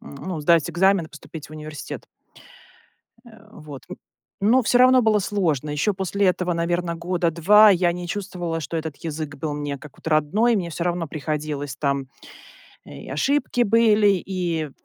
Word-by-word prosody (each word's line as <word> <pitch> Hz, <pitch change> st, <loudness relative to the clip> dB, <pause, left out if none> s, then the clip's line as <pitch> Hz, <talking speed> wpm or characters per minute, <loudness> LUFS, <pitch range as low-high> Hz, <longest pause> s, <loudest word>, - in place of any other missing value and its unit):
ну, 160 Hz, +3 st, -7 dB
сдать 170 Hz, +2 st, +3 dB
экзамен 185 Hz, 0 st, +2 dB
и -, -, -18 dB
поступить 155 Hz, -1 st, -11 dB
в -, -, -21 dB
университет. 155 Hz, -1 st, -8 dB, 1.2 s
Э, 235 Hz, -, -13 dB, 0.2 s
вот. 150 Hz, -4 st, -11 dB
М. 185 Hz, -, -6 dB, 0.4 s
Но 240 Hz, +6 st, +4 dB
всё 245 Hz, +2 st, +2 dB
равно 255 Hz, 0 st, +6 dB
было 215 Hz, -1 st, +3 dB
сложно. 170 Hz, -8 st, -1 dB
Еще 150 Hz, +8 st, 0 dB
после 195 Hz, +1 st, -1 dB
этого, 180 Hz, -1 st, +1 dB
наверно, 170 Hz, 0 st, -1 dB
года 170 Hz, 0 st, -1 dB
2 210 Hz, +6 st, +6 dB
я 180 Hz, -2 st, +3 dB
не 175 Hz, 0 st, -6 dB
чувствовала, 180 Hz, -5 st, -4 dB
что 155 Hz, +3 st, -5 dB
этот 160 Hz, -2 st, -4 dB
язык 155 Hz, -2 st, -5 dB
был 150 Hz, +1 st, -4 dB
мне 145 Hz, -1 st, -4 dB
как 150 Hz, -1 st, -14 dB
вот -, -, -19 dB
родной, 180 Hz, +11 st, +2 dB
мне 175 Hz, -3 st, -3 dB
всё 170 Hz, +1 st, -4 dB
равно 175 Hz, -3 st, -2 dB
приходилось, 150 Hz, -2 st, -4 dB
там, 140 Hz, -2 st, -1 dB, 0.8 s
э, -, -, -14 dB
и -, -, -11 dB
ошибки 245 Hz, -, 0 dB
были, 210 Hz, -3 st, +3 dB
и 170 Hz, -5 st, -2 dB
170 Hz, 170 wpm, -23 LUFS, 155-195 Hz, 1.2 s, равно